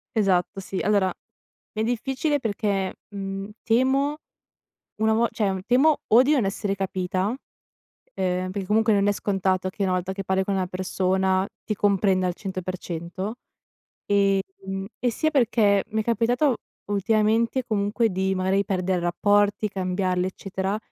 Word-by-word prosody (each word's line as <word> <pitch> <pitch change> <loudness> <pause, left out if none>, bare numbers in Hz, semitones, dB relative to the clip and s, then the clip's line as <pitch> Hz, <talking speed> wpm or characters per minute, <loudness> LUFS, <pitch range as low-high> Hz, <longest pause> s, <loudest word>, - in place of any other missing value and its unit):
Esatto 195 -2 +1
sì, 190 0 -4
allora, 200 -2 +2 0.6
è 215 - -2
difficile 265 +6 0
perché, 200 -5 -1
mhmm, 195 0 -5
temo 270 +5 +2 0.8
una 220 +1 +2
vo 230 +2 +3
cioè 195 -4 -1
temo 280 +5 +4
o 230 +3 +7
di 280 - +2
non 265 -8 +3
essere 195 +1 -1
capita, 185 -1 -1 0.7
uhm, 185 -1 -3
perché 195 0 -4
comunque 220 +3 +3
non 200 -1 +3
è 205 - +4
scontato 190 -2 0
che 200 - -4
una 190 - +1
volta 185 +1 -1
che 195 0 -5
parli 190 0 +1
con 195 +1 -1
una 190 -1 0
persona 185 +1 0 0.2
ti 215 - -2
comprenda 195 -2 +2
al 180 - 0
100% 185 +1 -5 0.7
ehm, 195 -1 0
e 245 - +1
sia 310 +7 0
perché 220 -7 +3
mi 220 0 0
è - - -5
capitato 240 +4 +2 0.3
ultimamente, 220 +4 +2
comunque, 215 +1 +1
di 190 +1 0
magari 190 +2 +1
perdere 185 -1 0
rapporti, 205 +4 +2
cambiarli, 185 -1 -1
eccetera, 190 +1 -3
195 Hz, 145 wpm, -24 LUFS, 190-220 Hz, 0.8 s, o